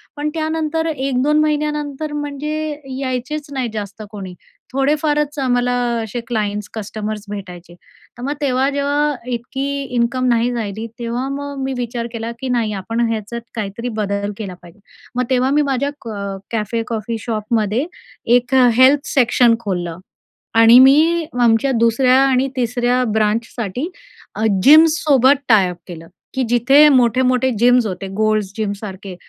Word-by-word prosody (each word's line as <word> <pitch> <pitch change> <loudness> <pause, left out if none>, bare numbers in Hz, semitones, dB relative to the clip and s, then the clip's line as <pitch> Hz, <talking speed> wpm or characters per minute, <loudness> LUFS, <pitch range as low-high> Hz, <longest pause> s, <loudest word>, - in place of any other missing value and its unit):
पण 295 0 -2
त्यानंतर 320 0 -1
1-2 275 0 0
महिन्यानंतर 300 -1 -1
म्हणजे 295 +1 -4 0.2
यायचेच 265 +3 -3
नाही 260 -3 -2
जास्त 205 0 -6
कोणी. 195 -4 -7 0.4
थोडेफारच 295 +2 0
आम्हाला 245 -2 +1 0.3
असे 220 +2 -5
क्लाइंट्स, 210 -3 -2
कस्टमर्स 215 -1 -5
भेटायचे. 180 -4 -8 0.4
तर - - -10
मग 280 +3 -1
तेव्हा, 265 -1 +1
जेव्हा 285 +1 0 0.2
इतकी 245 +3 -3 0.3
इन्कम 240 +2 0
नाही 235 +1 +2
राहिली 220 -2 -4
तेव्हा 240 +2 -3
मग 285 -1 -5
मी 265 0 -2
विचार 240 -1 -3
केला, 230 0 -4
की 265 - -4
नाही 230 -4 0
आपण 225 +5 -4
ह्याच्यात 225 +2 -4
काहीतरी 220 +2 -4
बदल 200 0 -2
केला 200 -4 -6
पाहिजे. 175 +3 -16 0.4
मग 250 - +1
तेव्हा 260 0 +2
मी 295 +1 +3
माझ्या 270 +2 0 0.2
क - - -5 0.4
कॅफे 225 +1 -2
कॉफी 225 0 -3
शॉपमध्ये 220 +2 -1 0.5
एक 245 +2 -4 0.2
हेल्थ 270 +3 +5
सेक्शन 240 -2 +4
खोललं. 175 -6 -3 0.6
आणि 230 +2 +8
मी 315 +5 +5
आमच्या 235 +3 +3
2ऱ्या 235 +3 +3
आणि 265 0 +2
3ऱ्या 245 +1 +1
ब्रांचसाठी 220 - -1 0.5
अ, 215 - -2 0.2
जिम्ससोबत 295 - +6
टायअप 190 -6 +4
केलं, 165 -2 -9 0.3
की 265 - 0
जिथे 270 +6 +5
मोठे-मोठे 255 -1 +3
जिम्स 245 +1 +4
होते 195 0 -5
गोल्ड्स 215 -3 +1
जिमसारखे. 200 -3 -5
245 Hz, 135 wpm, -18 LUFS, 215-280 Hz, 0.6 s, आणि